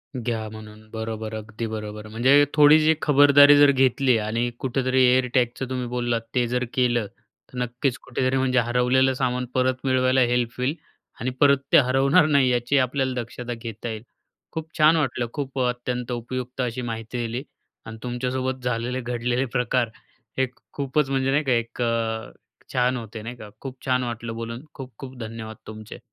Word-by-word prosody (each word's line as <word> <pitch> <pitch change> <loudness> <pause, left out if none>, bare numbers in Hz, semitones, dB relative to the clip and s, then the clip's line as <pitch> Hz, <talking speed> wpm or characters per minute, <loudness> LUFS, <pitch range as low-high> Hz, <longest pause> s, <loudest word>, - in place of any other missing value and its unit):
घ्या 115 -3 -3
म्हणून, 110 0 -12
बरोबर 110 -1 -5
अगदी 110 +1 -6
बरोबर. 105 -1 -6
म्हणजे 130 +7 +4
थोडीशी 155 +1 +6
खबरदारी 145 0 +7
जर 145 -1 +7
घेतली 130 -1 +3
आणि 115 +3 -1
कुठेतरी 130 -1 +1
एअरटॅगचं 125 0 +1
तुम्ही 125 -1 -3
बोललात 120 -1 -1
ते 120 -1 +2
जर 125 +1 -1
केलं. 120 -4 +1 0.4
तर 125 - -10
नक्कीच 125 +1 -1
कुठेतरी 130 0 -1
म्हणजे 130 -1 +2
हरवलेलं 125 +3 +2
सामान 125 -1 -1
परत 130 0 +2
मिळवायला 130 0 +3
हेल्प 120 -1 +1
होईल 130 +4 0 0.4
आणि 120 - -1
परत 140 -1 +6
ते - - +8
हरवणार 135 +3 +4
नाही 140 -4 +3
याची 120 +3 +1
आपल्याला 130 0 +1
दक्षता 120 +1 -6
घेता 115 0 -7
येईल. 110 -1 -6 0.5
खूप 160 -1 -5
छान 155 +1 +6
वाटलं, 125 -5 -1
खूप 135 -2 -4
अत्यंत 125 0 -2
उपयुक्त 125 +2 -4
अशी 125 0 -2
माहिती 115 0 -5
दिली 120 +3 -4 0.4
आणि 110 0 -8
तुमच्यासोबत 130 +1 -3
झालेले 125 +1 -2
घडलेले 120 +2 -1
प्रकार 125 -1 0 0.5
हे 130 0 +2 0.3
खूपच 140 0 0
म्हणजे, 135 0 +1
नाही 145 +3 +2
का 135 - -1
एक 115 0 -1
अ, 115 -1 -1 0.4
छान 125 0 +2
होते 110 -1 -7
नाही 120 +3 -7
का? 105 -3 -11
खूप 135 -1 -7
छान 125 -1 +1
वाटलं 115 -1 -5
बोलून 115 +2 -6
खूप-खूप 130 0 -10
धन्यवाद 110 -1 -7
तुमचे. 110 0 -9
125 Hz, 160 wpm, -24 LUFS, 115-130 Hz, 0.5 s, ते